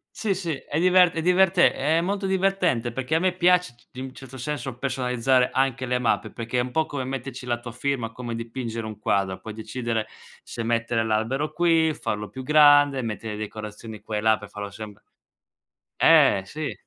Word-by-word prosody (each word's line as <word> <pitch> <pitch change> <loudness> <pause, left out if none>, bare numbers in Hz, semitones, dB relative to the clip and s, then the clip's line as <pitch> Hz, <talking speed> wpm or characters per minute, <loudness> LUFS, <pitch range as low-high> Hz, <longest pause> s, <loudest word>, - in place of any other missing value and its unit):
Sì, 205 -3 -1
sì, 175 -3 -3
è 150 - -4
divert 180 0 +5
è 160 - -2
diverte 180 +1 +4
è 155 +4 +1
molto 195 +3 -2
divertente 185 -11 +1
perché 130 +5 -2
a - - +3
me 185 +1 +2
piace 180 -6 +3
c 120 - -27
c - - -18
in 130 - -4
un 130 - -9
certo 135 -1 -11
senso 130 -1 -4
personalizzare 125 -1 +1
anche 130 -1 0
le 125 0 +1
mappe, 125 -2 0
perché 115 +1 -3
è - - +3
un 125 - -3
po' 160 +5 0
come 145 -4 -4
metterci 130 -1 -6
la 120 -1 0
tua 120 0 -8
firma, 125 -2 -2
come 120 0 -6
dipingere 115 -1 -5
un 110 -1 -7
quadro, 95 -3 0
puoi 110 +2 -8
decidere 115 0 -3 0.4
se 120 - -7
mettere 115 0 0
l'albero 115 +7 -1
qui, 165 -1 +2
farlo 105 -7 -4
più 130 +6 -8
grande, 145 -1 +5
mettere 110 -1 -5
le 105 - -6
decorazioni 110 0 -7
qua 110 0 -6
e - - -1
là 110 0 +3
per 105 0 -11
farlo 105 -1 -6
sembr 105 0 -10 1.0
eh, 95 - +5
sì. 155 +8 -5
125 Hz, 200 wpm, -24 LUFS, 115-150 Hz, 1.0 s, divert